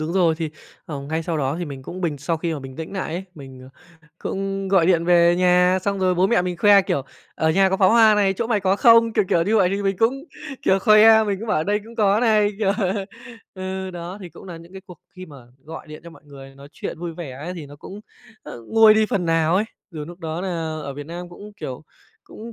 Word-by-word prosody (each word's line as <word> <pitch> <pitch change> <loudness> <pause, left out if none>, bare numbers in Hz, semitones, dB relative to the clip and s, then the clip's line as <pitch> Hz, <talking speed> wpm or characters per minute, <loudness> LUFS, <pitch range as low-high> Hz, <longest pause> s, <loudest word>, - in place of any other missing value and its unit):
đúng 155 +2 -3
rồi 175 -4 +2
thì, 160 -2 -4 0.4
ờ, 145 -3 -6
ngay 160 +4 -3
sau 165 0 -3
đó 140 0 -1
thì 175 - -3
mình 140 -4 -8
cũng 185 +7 -8
bình 160 -5 -2
sau 165 +4 -2
khi 165 +1 -3
mà 150 - -6
bình 130 -1 -10
tĩnh 160 +2 -7
nại 190 -4 -4
ấy. 180 +2 -5
Mình, 135 -3 -12 0.4
à, 150 - -25
cũng 195 0 -4
gọi 190 -4 +3
điện 170 -2 +2
về 175 0 +4
nhà, 180 +1 +3
xong 200 0 -1
rồi 185 -1 +1
bố 180 +2 +2
mẹ 230 -2 +2
mình 180 -1 -3
khoe, 200 +2 +5
kiểu: 140 -6 -2 0.3
"Ở 160 - +1
nhà 190 +4 +3
có 190 - +1
pháo 190 -1 +4
hoa 225 -2 +6
này, 200 -2 +2
chỗ 225 +4 -3
mày 220 -3 0
có 190 +1 +1
không?" 230 -1 +5
Kiểu, 215 -2 +2
kiểu, 170 - +2
như 210 +6 +1
vậy 190 -4 +4
thì 200 +1 -2
mình 195 -1 0
cũng, 265 +5 0 0.4
kiểu, 190 - +3
khoe, 215 +2 +6
mình 200 -2 -2
cũng 225 +3 -7
bảo: - - +1
"Ở 155 - -2
đây 205 +3 0
cũng 230 +1 -13
có 205 -1 +2
này." 215 -3 +3
Kiểu 200 -3 +1 0.8
ừ, 190 0 -5
đó 175 +2 -8
thì 185 - -8
cũng 170 +3 -14
nà 175 -3 -8
những 170 +2 -14
cái 190 - -9
cuộc 180 - -13 0.2
khi 185 0 -9
mà 150 -4 -13 0.3
gọi 160 +1 -9
điện 155 0 -10
cho 170 - -10
mọi 165 - -17
người 135 -2 -13
nói 140 +1 -14
chuyện - - -7
vui 170 0 -5
vẻ 160 -5 -7
ấy 155 +8 -7
thì 160 -5 -8
nó 145 +1 -13
cũng, 195 +7 -10 0.4
ơ, - - -10
nguôi 220 -1 +6
đi 215 0 +3
phần 195 -4 -2
nào 165 0 +2
ấy, 205 - +1 0.3
dù 155 -4 -7
núc 175 +3 -11
đó 160 0 -4
nà 190 - -3 0.3
ở 140 -1 -6
Việt 145 0 -8
Nam 175 +2 -7
cũng, 205 +4 -12
kiểu, 130 -7 -7 0.4
cũng 230 +2 -11
180 Hz, 265 wpm, -21 LUFS, 160-200 Hz, 0.8 s, hoa